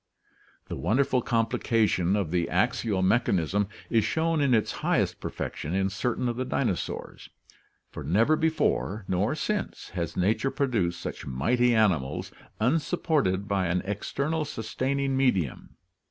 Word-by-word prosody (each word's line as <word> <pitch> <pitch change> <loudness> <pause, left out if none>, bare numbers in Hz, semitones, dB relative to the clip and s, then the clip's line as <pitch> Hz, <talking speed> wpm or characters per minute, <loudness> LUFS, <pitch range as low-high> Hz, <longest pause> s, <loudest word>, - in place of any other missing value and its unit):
The - - -5
wonderful 130 +2 +1
complication 115 -5 +1
of 100 -6 -1
the 85 -1 0
axial 100 -5 +1
mechanism 100 -2 +2 0.2
is 115 -2 +2
shown 160 +3 +1
in 140 -2 +2
its 110 - +1
highest - - +1
perfection 80 +5 -4
in 95 0 +1
certain 120 +4 -1
of 120 -1 -2
the 130 - 0
dinosaurs, 125 -7 -3 0.6
for 75 - -7
never 110 - +3
before 155 -10 0
nor 100 +10 +1
since 210 +5 -3
has 85 -3 -4
nature 105 +8 +2
produced 115 -12 0
such - - -6
mighty 120 - +2
animals 90 -12 +1 0.3
unsupported 135 - +1
by 95 -3 +1
an 90 +1 0
external 140 +10 -2
sustaining 135 +1 -2
medium. 100 - 0
110 Hz, 130 wpm, -27 LUFS, 95-135 Hz, 0.6 s, never